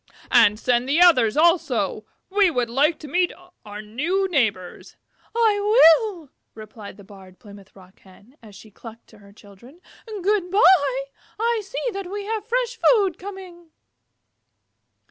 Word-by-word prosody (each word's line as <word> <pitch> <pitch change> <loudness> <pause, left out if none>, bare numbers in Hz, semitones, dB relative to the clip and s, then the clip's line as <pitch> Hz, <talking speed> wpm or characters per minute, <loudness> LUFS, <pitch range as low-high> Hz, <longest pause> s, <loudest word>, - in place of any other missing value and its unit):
And 210 +1 +4
send 245 +1 -1
the 300 +4 +1
others 290 -10 +4
also. 340 +2 0 0.2
We 400 -1 +3
would 245 -7 -3
like 295 +6 +1
to 305 - -9
meet 355 +5 0 0.3
our 210 0 -10
new 325 - -2
neighbors." 220 - -3 0.4
"I 445 -3 +2
will," 400 - +3 0.2
replied 215 -2 -12
the 200 - -15
Barred 190 -2 -16
Plymouth 200 -2 -17
Rock 185 -1 -19
Hen, 200 +7 -21
as 210 -3 -16
she 215 +2 -16
clucked 230 +2 -14
to - - -19
her 200 -1 -18
Chickens. 210 - -18 0.3
"Good 410 -3 -2
by. 345 - +3 0.4
I 465 0 -1
see 485 +4 -5
that 390 -2 -7
we 405 +1 -6
have 435 0 -5
fresh 480 -1 -2
food 400 -7 +2
coming." 370 -3 -11
310 Hz, 145 wpm, -21 LUFS, -, 0.4 s, And